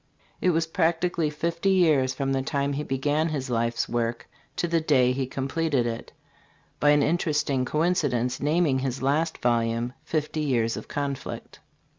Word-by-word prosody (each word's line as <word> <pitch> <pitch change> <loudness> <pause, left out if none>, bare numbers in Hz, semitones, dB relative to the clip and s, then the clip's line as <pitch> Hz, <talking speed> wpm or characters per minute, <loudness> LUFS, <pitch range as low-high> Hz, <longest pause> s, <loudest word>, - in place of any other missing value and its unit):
It 185 - +3
was 165 -1 +2
practically 165 0 0
fifty 170 +5 -1
years 155 -9 +4
from 135 -1 -1
the 135 - +1
time 140 +1 -1
he 140 - -2
began 145 +3 0
his 135 -4 -3
life's 115 0 0
work 115 -1 -2 0.3
to 175 - -1
the 165 -1 +1
day 130 -5 +3
he 130 0 -2
completed 135 0 -1
it 115 0 -4 0.7
by 145 - +4
an 145 -1 +5
interesting 150 -5 +1
coincidence 145 -6 0
naming 150 -2 +2
his 130 0 -3
last 155 +4 +1
volume, 120 0 0
"Fifty 155 0 -2
Years 120 -6 +1
of - - -7
Conflict." 140 -2 -5
140 Hz, 155 wpm, -26 LUFS, 130-160 Hz, 0.7 s, an